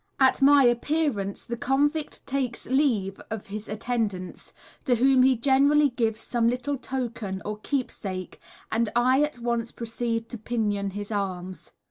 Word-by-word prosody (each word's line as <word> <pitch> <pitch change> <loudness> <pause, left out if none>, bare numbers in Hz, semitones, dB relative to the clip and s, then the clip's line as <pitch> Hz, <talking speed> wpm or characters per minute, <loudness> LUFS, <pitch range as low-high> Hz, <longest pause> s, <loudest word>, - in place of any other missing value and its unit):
At 265 0 +4
my 280 0 +7
appearance 240 -4 0
the 235 - -3
convict 290 +5 0
takes 260 -3 -2
leave 235 -8 +1
of 220 -2 -5
his 215 0 -6
attendants, 215 -4 -3 0.3
to 250 -4 +3
whom 260 +2 +4
he 260 0 +5
generally 280 +3 +4
gives 225 -3 -1
some 235 -2 0
little 250 +4 -1
token 235 -7 -4
or 210 0 -4
keepsake, 200 -8 -4 0.3
and 225 0 +1
I 255 +3 +4
at 300 -3 0
once 235 -1 -2
proceed 230 0 -3
to 235 - -7
pinion 210 -3 -1
his 205 +2 -6
arms. 185 -3 -4
235 Hz, 145 wpm, -26 LUFS, 210-265 Hz, 0.3 s, my